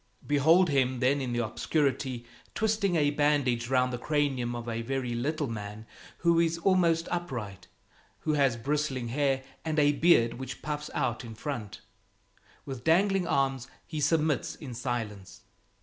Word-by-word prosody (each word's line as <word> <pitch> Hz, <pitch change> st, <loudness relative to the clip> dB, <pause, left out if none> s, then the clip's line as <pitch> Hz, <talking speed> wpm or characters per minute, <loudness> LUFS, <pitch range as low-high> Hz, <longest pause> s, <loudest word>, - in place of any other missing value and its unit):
Behold 160 Hz, +5 st, +4 dB
him 130 Hz, -2 st, +1 dB
then 135 Hz, +3 st, +2 dB
in 125 Hz, -2 st, -3 dB
the 120 Hz, -1 st, 0 dB
obscurity, 130 Hz, 0 st, -1 dB, 0.3 s
twisting 215 Hz, -4 st, +1 dB
a 145 Hz, -3 st, +3 dB
bandage 140 Hz, -5 st, +1 dB
round 125 Hz, -1 st, +2 dB
the 120 Hz, -, -3 dB
cranium 135 Hz, -5 st, 0 dB
of 120 Hz, 0 st, -6 dB
a 115 Hz, 0 st, -2 dB
very 125 Hz, 0 st, -2 dB
little 145 Hz, +6 st, -1 dB
man 105 Hz, -2 st, -6 dB, 0.3 s
who 170 Hz, 0 st, +3 dB
is 165 Hz, 0 st, +2 dB
almost 170 Hz, -2 st, +2 dB
upright, 120 Hz, -, -4 dB, 0.5 s
who 155 Hz, -, 0 dB
has 135 Hz, -5 st, +2 dB
bristling 135 Hz, -1 st, -1 dB
hair 135 Hz, 0 st, +1 dB, 0.2 s
and 160 Hz, 0 st, -2 dB
a 145 Hz, -1 st, +5 dB
beard 145 Hz, -6 st, +4 dB
which 130 Hz, -1 st, -7 dB
puffs 150 Hz, 0 st, -4 dB
out 125 Hz, -4 st, -1 dB
in 115 Hz, -2 st, -9 dB
front. 115 Hz, -4 st, -5 dB, 0.8 s
With 130 Hz, -3 st, -6 dB
dangling 190 Hz, +3 st, +3 dB
arms, 135 Hz, -2 st, 0 dB, 0.2 s
he 155 Hz, -3 st, -5 dB
submits 155 Hz, -2 st, +1 dB
in 135 Hz, -5 st, -8 dB
silence. 115 Hz, -5 st, -5 dB
135 Hz, 150 wpm, -29 LUFS, 120-155 Hz, 0.8 s, a